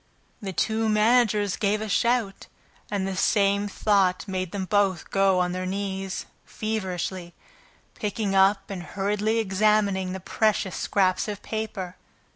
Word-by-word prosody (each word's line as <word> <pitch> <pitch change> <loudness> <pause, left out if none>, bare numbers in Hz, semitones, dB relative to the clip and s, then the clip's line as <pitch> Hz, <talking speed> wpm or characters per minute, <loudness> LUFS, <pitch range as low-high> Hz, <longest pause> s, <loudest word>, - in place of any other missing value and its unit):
The 195 -2 -4
two 220 +4 0
managers 215 -2 +3
gave 210 0 0
a 220 - -4
shout, 225 0 0 0.4
and 200 -2 -1
the 195 - -3
same 200 +1 +2
thought 195 -4 +1
made 185 -2 -3
them 195 -2 -3
both 195 -3 +1
go 195 -1 +3
on 180 0 +1
their 185 0 -3
knees, 195 -1 -3 0.2
feverishly, 185 -4 -4 0.6
picking 210 -1 -2
up 195 +1 +3
and 190 -2 -4
hurriedly 205 +4 -1
examining 200 -2 +2
the 190 - -4
precious 200 0 0
scraps 185 -1 +1
of 205 -2 -5
paper. 210 -5 -4
200 Hz, 135 wpm, -25 LUFS, 190-215 Hz, 0.6 s, managers